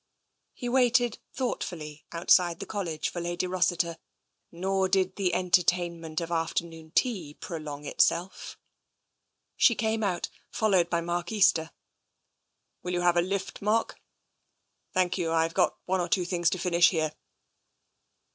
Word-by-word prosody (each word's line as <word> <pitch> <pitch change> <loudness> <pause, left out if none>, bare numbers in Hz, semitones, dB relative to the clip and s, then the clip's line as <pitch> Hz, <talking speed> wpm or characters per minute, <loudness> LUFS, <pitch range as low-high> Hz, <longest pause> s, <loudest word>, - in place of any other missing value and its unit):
He 245 - -5
waited 245 -2 +3
thoughtfully 160 - -4
outside 170 0 +3
the - - -5
College 175 -7 -3
for 175 - -5
Lady 175 +1 -2
Rossiter, 175 -2 0 0.5
nor 190 +2 0
did 185 -1 +1
the 190 -3 0
entertainment 175 -3 +1
of 170 0 -5
afternoon 165 -1 -2
tea 185 - 0
prolong 150 -3 -7
itself. 175 +5 0 1.0
She 235 - +5
came 220 +1 0
out, 180 -4 -1 0.2
followed 190 -6 +2
by 170 -1 0
Mark 175 +2 -3
Easter. 185 -6 +3 0.6
" - - -52
Will 180 - -4
you 175 - 0
have 175 0 +3
a 175 - +4
lift, 190 +2 -3
Mark? 215 +3 0 0.3
" - - -50
" - - -49
Thank 185 0 +1
you, 170 - 0
Fve 165 0 +1
got - - +2
one 190 0 0
or 175 - -3
two 180 -1 +1
things 175 -1 +1
to 185 - -2
finish 175 -1 +4
here." 155 -3 -1
175 Hz, 145 wpm, -28 LUFS, 170-190 Hz, 1.0 s, She